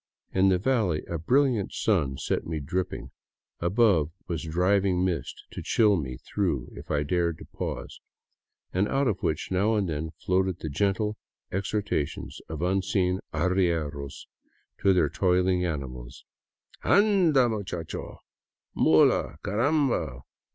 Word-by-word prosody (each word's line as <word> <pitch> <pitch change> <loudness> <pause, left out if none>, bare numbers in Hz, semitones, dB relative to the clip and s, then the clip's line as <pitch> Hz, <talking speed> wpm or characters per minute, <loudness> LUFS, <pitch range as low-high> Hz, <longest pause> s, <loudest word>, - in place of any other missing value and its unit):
In 95 +1 +4
the 95 - +4
valley 100 -7 +1
a 85 - -4
brilliant 125 - +2
sun 75 -11 +1
set - - -1
me 80 -1 -2
dripping; 90 +6 -3 0.5
above 90 -4 +3 0.2
was 85 -3 -2
driving 90 +3 +2
mist 90 -3 -3
to - - -6
chill 105 -3 +3
me 65 -7 -3
through 80 -2 -2
if - - -10
I 75 -1 +1
dared 85 +1 0
to - - -11
pause, - - -6 0.7
and 95 +3 +2
out 135 +3 +1
of 105 -5 -1
which 80 - -2
now 100 +4 +2
and 100 -3 +1
then 80 0 -3 0.2
floated 95 -1 +1
the 80 - -5
gentle 100 +7 0 0.3
exhortations 100 -5 -2
of 80 +1 -4
unseen 95 0 +1
arrieros 80 -5 -1 0.5
to 100 - +4
their 90 -5 +4
toiling 90 +2 +2
animals: 65 -7 -5 0.3
" - - -28
Anda, 180 - +4
macho! 100 -7 -5 0.5
Mula, 75 -3 +4
caramba 110 - +1
90 Hz, 130 wpm, -27 LUFS, 80-105 Hz, 0.7 s, In